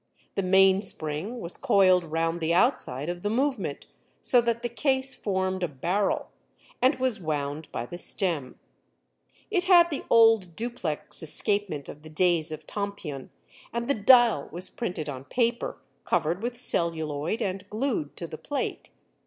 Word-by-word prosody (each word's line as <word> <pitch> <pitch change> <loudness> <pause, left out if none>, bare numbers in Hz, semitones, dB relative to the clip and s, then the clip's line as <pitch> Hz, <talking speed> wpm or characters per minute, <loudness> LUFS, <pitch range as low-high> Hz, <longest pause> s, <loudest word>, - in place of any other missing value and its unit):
The 195 - -1
mainspring 190 0 +2
was 170 - -2
coiled 190 -8 +4
round 165 +1 -1
the 165 +1 +1
outside 150 - +2
of 175 0 -4
the 205 - -1
movement, 235 - -1 0.3
so 245 - +4
that 235 0 -1
the - - +1
case 265 +3 0
formed 190 -2 -2
a 175 - +1
barrel, 175 +8 -1 0.5
and 260 +3 +4
was 255 -4 0
wound 150 -2 -3
by 120 - -4
the 175 +8 -8
stem. 165 -12 0 0.9
It 365 -4 +1
had 345 -2 +6
the 285 - -3
old 225 -7 +5
duplex 220 -10 -3
escapement 165 -1 0
of 150 - -10
the 155 - -12
days 165 0 +1
of 155 0 -7
Tompion 200 -10 -5 0.4
and 235 0 -3
the 280 - +3
dial 230 - +5
was 175 +3 -5
printed 180 -10 -4
on 135 -2 -6
paper, 235 - -1 0.3
covered 170 +1 0
with 240 +1 -3
celluloid 165 -4 0
and 195 -2 -4
glued 215 - -2
to 170 - -5
the 155 -1 -8
plate. 290 - -4
185 Hz, 155 wpm, -27 LUFS, 160-235 Hz, 0.9 s, had